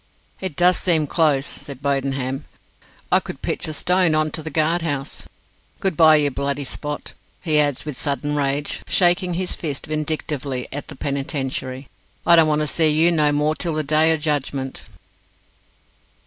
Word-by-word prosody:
"It 185 -6 -5
does 180 +2 +4
seem 165 -5 +2
close," 145 -3 +2
said 140 -2 -7
Bodenham; 135 -1 -2 0.7
"I - - +6
could - - -9
pitch - - -2
a 155 - -3
stone 180 -1 +3
on 155 0 +1
to 160 - -4
the 160 - -4
guard 160 +2 +1
house. 145 -4 -4 0.5
Good 190 -4 -1
bye, 155 0 +7
you 145 -2 +2
Bloody 140 +1 -2
Spot!" 150 +2 -5 0.3
he 155 -4 +2
adds, 145 -2 +1
with 150 -4 -6
sudden 145 0 -1
rage, 145 0 -1
shaking 180 0 +2
his 185 +1 -2
fist 145 -5 -5
vindictively 150 -4 -3
at 145 0 -5
the - - -9
Penitentiary; 135 -2 -3 0.4
"I 170 - +7
don't 165 -2 +5
want 150 0 +1
to - - 0
see 160 +1 +3
you 160 +3 +4
no 150 -3 +3
more 150 +1 +1
till 165 0 -3
the 155 - 0
Day 155 +2 +3
o' 160 - +2
Judgment." 140 -3 -2
150 Hz, 170 wpm, -21 LUFS, 140-160 Hz, 0.7 s, bye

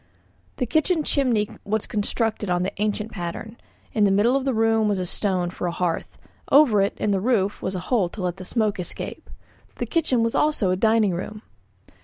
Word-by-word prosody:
The 250 - 0
kitchen 315 - +1
chimney 245 -8 +1 0.2
was 215 +1 -1
constructed 215 -1 -1
on 180 0 +1
the 190 - -2
ancient 210 +1 -1
pattern; 190 +5 -6 0.4
in 215 - +2
the 200 - +5
middle 210 +6 +3
of 275 -1 0
the 270 - +1
room 225 -1 +3
was 205 -2 +1
a 185 - -2
stone 180 -1 -1
for 180 - -4
a - - -1
hearth, 170 -1 -2 0.3
over 265 -8 +6
it 195 - 0
in 210 - 0
the 195 - +2
roof 210 -3 +1
a 190 0 -2
hole 185 0 0
to 200 - -8
let 180 0 -2
the 185 - -8
smoke 215 0 0
escape. 180 - -5 0.5
The - - -3
kitchen 280 -8 +1
was 230 - 0
also 295 -11 +2
a - - +2
dining 220 0 +3
room. 210 +5 -6
210 Hz, 200 wpm, -24 LUFS, 190-230 Hz, 0.5 s, over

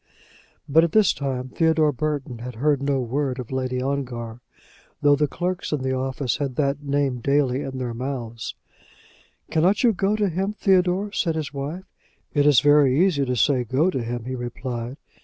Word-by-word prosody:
But 160 +3 +5
at 170 - 0
this 215 -3 +5
time 130 -2 -3
Theodore 160 0 +2
Burton 140 -3 -3
had 125 0 -7
heard 145 +3 +1
no 140 -1 +1
word 130 +2 -2
of 125 -2 -7
Lady 130 -1 -2
Ongar, 125 -4 -4 0.6
though 145 0 +6
the 150 +1 +1
clerks 180 +5 -3
in 145 -4 -1
the 130 0 0
office 130 0 -1
had 140 -4 -3
that 140 0 0
name 140 -3 0
daily 140 0 +1
in 135 -2 -5
their 125 -2 -3
mouths. 120 -2 -5 1.0
"Cannot 175 +8 +2
you 235 -2 +5
go 195 +2 +1
to 210 -1 +1
him, 190 +4 -2
Theodore?" 190 0 +2
said 165 -5 0
his 155 -2 -4
wife. 145 +7 -5 0.5
"It 145 -1 +3
is 145 -4 +6
very 145 -2 +5
easy 170 -7 +3
to 125 -1 -1
say 125 +2 +2
go 135 - +1
to 130 - -2
him," 120 0 -4
he 130 - -4
replied. 120 0 -5
140 Hz, 180 wpm, -23 LUFS, 125-155 Hz, 1.0 s, though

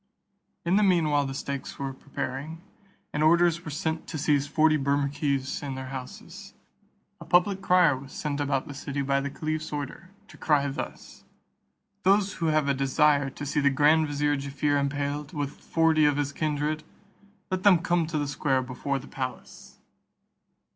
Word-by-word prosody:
In 175 +3 +3
the - - +4
mean 175 -6 +3
while 145 -1 +2
the 135 - -4
stakes 140 0 -5
were 135 -1 -4
preparing, 140 +4 -6 0.5
and 150 - -1
orders 170 +1 +4
were 155 - -6
sent 160 +2 -3
to - - -5
seize 145 -1 +1
forty 155 +1 +3
Bermukkees 140 -1 0
in 140 -2 -4
their 130 0 -6
houses; 130 -1 -9 0.6
a - - -9
public 180 +4 +3
crier 180 -6 +4
was 135 +1 -10
sent 145 -2 -3
about 140 -2 -1
the 145 - -7
city 140 0 -4
by 140 0 +1
the 140 - -3
caliph's 155 +2 -4
order, 150 +5 -6 0.2
to - - -15
cry 145 -2 +2
thus: 135 - -7 0.8
"Those 200 0 +3
who 165 - +2
have 155 -2 +2
a 140 - +3
desire 140 +1 +2
to 145 +2 -7
see 145 +1 0
the 140 -1 +4
grand 150 +3 +4
vizier 145 0 0
Jaaffier 140 +1 0
impaled, 145 +1 -2
with 145 -2 -2
forty 160 -1 +2
of 145 -1 +3
his 145 -1 -1
kindred, 150 0 -1 0.7
let 185 0 -1
them 195 -2 +6
come 170 0 0
to 155 -1 -2
the 145 -1 -1
square 135 -2 0
before 125 +2 -3
the 135 - -8
palace." 130 -2 -7
145 Hz, 175 wpm, -27 LUFS, 140-160 Hz, 0.8 s, them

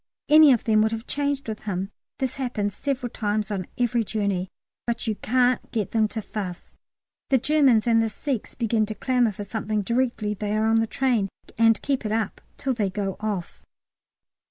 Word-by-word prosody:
Any 305 -1 +8
of 240 - +3
them 215 -1 +3
would 220 0 +2
have 225 +1 -5
changed 285 -2 -1
with 220 -1 -4
him. 195 0 -3 0.3
This 260 -1 -2
happens 215 -7 -2
several 260 -3 -2
times 210 -1 -1
on 190 -3 -3
every 240 -1 +1
journey, 200 -4 -1 0.4
but 235 0 -1
you 220 - +1
can't 250 +3 +1
get 215 -5 -2
them 220 -1 +3
to 220 0 -5
fuss. 190 -5 -6 0.5
The 265 - +5
Germans 265 -4 +4
and 230 -1 +4
the 225 - +1
Sikhs 250 +1 -4
begin 225 -2 +1
to 215 - -5
clamour 245 0 +2
for 205 +1 -6
something 215 0 -2
directly 235 -2 0
they 210 +1 -2
are 215 - +2
on 225 0 +3
the 225 0 +2
train, 235 -6 +1 0.3
and 225 -1 +4
keep 275 -3 0
it 215 - -2
up 220 -2 -1 0.2
till 270 -2 -1
they 210 -5 0
go 195 0 -3
off. 205 -5 -4
220 Hz, 190 wpm, -25 LUFS, 210-250 Hz, 0.5 s, Any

